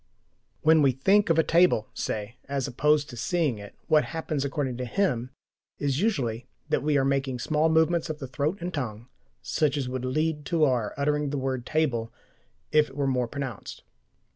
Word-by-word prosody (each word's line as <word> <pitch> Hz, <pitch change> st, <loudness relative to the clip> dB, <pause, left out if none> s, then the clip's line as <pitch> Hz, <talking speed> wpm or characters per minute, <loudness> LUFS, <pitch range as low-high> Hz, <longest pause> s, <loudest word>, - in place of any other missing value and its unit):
When 160 Hz, 0 st, +6 dB
we 135 Hz, -2 st, +4 dB
"think" 195 Hz, +11 st, +3 dB
of 165 Hz, -, +3 dB
a 160 Hz, -, +5 dB
table 165 Hz, -11 st, +3 dB
(say), 105 Hz, +3 st, -4 dB
as 140 Hz, -2 st, -1 dB
opposed 150 Hz, +3 st, +2 dB
to -, -, -8 dB
seeing 145 Hz, -, 0 dB
it, 100 Hz, 0 st, -11 dB
what 155 Hz, -1 st, +4 dB
happens, 160 Hz, -3 st, -3 dB
according 140 Hz, -3 st, -2 dB
to 125 Hz, -, -3 dB
him, 125 Hz, -6 st, 0 dB, 0.5 s
is 140 Hz, +1 st, -1 dB
usually 130 Hz, -, -1 dB, 0.2 s
that -, -, +1 dB
we 150 Hz, 0 st, +2 dB
are 135 Hz, -, +2 dB
making 135 Hz, -1 st, 0 dB
small 155 Hz, +5 st, +1 dB
movements 160 Hz, +1 st, +2 dB
of 155 Hz, -, -3 dB
the 145 Hz, -, -6 dB
throat 145 Hz, +7 st, -2 dB
and 180 Hz, +1 st, -4 dB
tongue 120 Hz, -4 st, -5 dB, 0.3 s
such 150 Hz, -2 st, 0 dB
as 135 Hz, -3 st, -2 dB
would 125 Hz, 0 st, -4 dB
lead 150 Hz, +4 st, -1 dB
to 160 Hz, +3 st, +1 dB
our 125 Hz, -7 st, +1 dB
uttering 150 Hz, 0 st, 0 dB
the 145 Hz, -, -2 dB
word 130 Hz, -2 st, -3 dB
"table" 125 Hz, -8 st, 0 dB, 0.6 s
if 150 Hz, 0 st, +4 dB
they 135 Hz, -, -15 dB
were 140 Hz, -1 st, 0 dB
more 125 Hz, -2 st, +1 dB
pronounced. 135 Hz, -4 st, -6 dB
140 Hz, 190 wpm, -27 LUFS, 125-155 Hz, 0.6 s, When